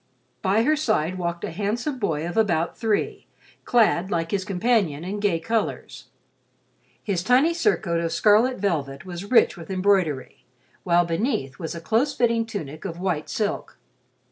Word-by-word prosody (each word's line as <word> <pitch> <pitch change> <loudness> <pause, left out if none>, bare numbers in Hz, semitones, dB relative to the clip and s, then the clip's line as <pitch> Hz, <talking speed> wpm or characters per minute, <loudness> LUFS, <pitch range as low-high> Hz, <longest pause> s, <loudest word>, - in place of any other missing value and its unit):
By 200 +3 +2
her 305 +5 +3
side 185 - 0
walked 170 -1 -3
a - - -3
handsome 225 - -2
boy 165 -7 -1
of 175 - -5
about 175 -7 +1
three, 220 -3 -1 0.4
clad, 210 -6 +3
like 165 -4 -1
his 195 -2 0
companion, 195 -5 0
in 195 +3 -4
gay 200 -5 +1
colors. 225 +6 -3 1.0
His 195 -5 -1
tiny 255 - +3
surcoat 220 - +1
of 165 -1 -2
scarlet 220 +5 +4
velvet 155 -6 -2
was 180 +1 -6
rich 255 - +5
with 170 -1 -11
embroidery, 185 -8 0 0.4
while 175 -1 +3
beneath 170 - -2
was 165 +1 -5
a - - -5
close 235 - +1
fitting 230 -1 +1
tunic 155 -9 -6
of 175 -3 -6
white 180 -5 -2
silk. 210 -2 -3
195 Hz, 155 wpm, -24 LUFS, 170-225 Hz, 1.0 s, rich